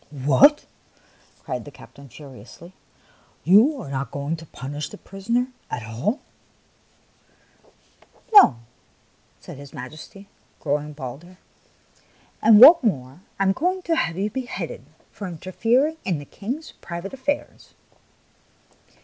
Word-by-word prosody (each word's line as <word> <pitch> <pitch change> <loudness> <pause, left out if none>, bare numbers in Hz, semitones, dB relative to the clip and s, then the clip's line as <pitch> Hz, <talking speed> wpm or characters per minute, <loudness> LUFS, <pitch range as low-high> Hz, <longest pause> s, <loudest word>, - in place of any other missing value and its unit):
" - - -34
What! 145 - +4 0.4
" - - -32
cried - - -4
the - - -10
captain, 140 -1 -15
furiously. 135 - -13 0.3
" - - -33
You 225 - +5
are 140 - -8
not 135 -2 -3
going 140 +4 -3
to 165 0 -12
punish 145 +3 -6
the 210 - -11
prisoner 235 +7 -2 0.2
at 120 - -4
all? 125 - -3 1.4
" 460 - -28
"No," 400 - +8 0.8
said - - -11
his 140 -1 -12
Majesty, 155 +10 -10 0.3
growing 150 0 -2
bolder; 150 +6 -9 0.5
" - - -34
and 215 -1 +7
what 295 +8 +11
is - - -30
more, 130 -1 -8 0.2
I - - +2
am 190 - +3
going 365 - -1
to 335 - 0
have 165 - -1
you 205 +2 -2
beheaded 250 +1 -6 0.3
for 200 - -7
interfering 230 - 0
in 180 -4 -1
the 145 - -9
King's 255 - -6
private 170 +5 -7
affairs 275 +2 -4
180 Hz, 140 wpm, -23 LUFS, -, 1.4 s, what